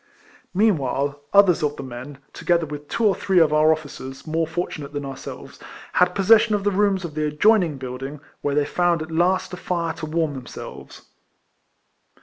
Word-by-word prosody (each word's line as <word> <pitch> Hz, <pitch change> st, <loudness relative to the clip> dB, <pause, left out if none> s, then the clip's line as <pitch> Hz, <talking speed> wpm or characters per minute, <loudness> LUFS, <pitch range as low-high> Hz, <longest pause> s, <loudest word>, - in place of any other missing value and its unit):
Meanwhile, 145 Hz, -, +1 dB
others 200 Hz, -3 st, +5 dB
of 150 Hz, -1 st, 0 dB
the -, -, -7 dB
men, 130 Hz, +2 st, -8 dB, 0.2 s
together 170 Hz, -2 st, +1 dB
with 150 Hz, -1 st, -8 dB
two 230 Hz, -, -2 dB
or 205 Hz, -, +5 dB
three 190 Hz, -1 st, -1 dB
of 160 Hz, -3 st, +5 dB
our 155 Hz, +1 st, +5 dB
officers, 140 Hz, -3 st, -5 dB
more 160 Hz, 0 st, -1 dB
fortunate 160 Hz, -3 st, -4 dB
than 145 Hz, -1 st, -4 dB
ourselves, 135 Hz, -1 st, -9 dB, 0.3 s
had 180 Hz, -, +3 dB
posses 210 Hz, +3 st, +6 dB
sion 220 Hz, -2 st, +1 dB
of 200 Hz, -, -2 dB
the 205 Hz, -, +2 dB
rooms 195 Hz, -2 st, +1 dB
of 160 Hz, -, -7 dB
the 155 Hz, 0 st, -1 dB
adjoining 170 Hz, 0 st, +3 dB
building, 135 Hz, +2 st, -6 dB, 0.2 s
where 140 Hz, -1 st, -1 dB
they 145 Hz, -1 st, +2 dB
found 175 Hz, +1 st, +1 dB
at 160 Hz, -, -10 dB
least 180 Hz, +3 st, +1 dB
a -, -, -4 dB
fire 170 Hz, -3 st, -2 dB
to 155 Hz, -, -6 dB
warm 160 Hz, -1 st, 0 dB
them 130 Hz, -3 st, -8 dB
selves. -, -, -10 dB
160 Hz, 185 wpm, -23 LUFS, 145-180 Hz, 0.3 s, posses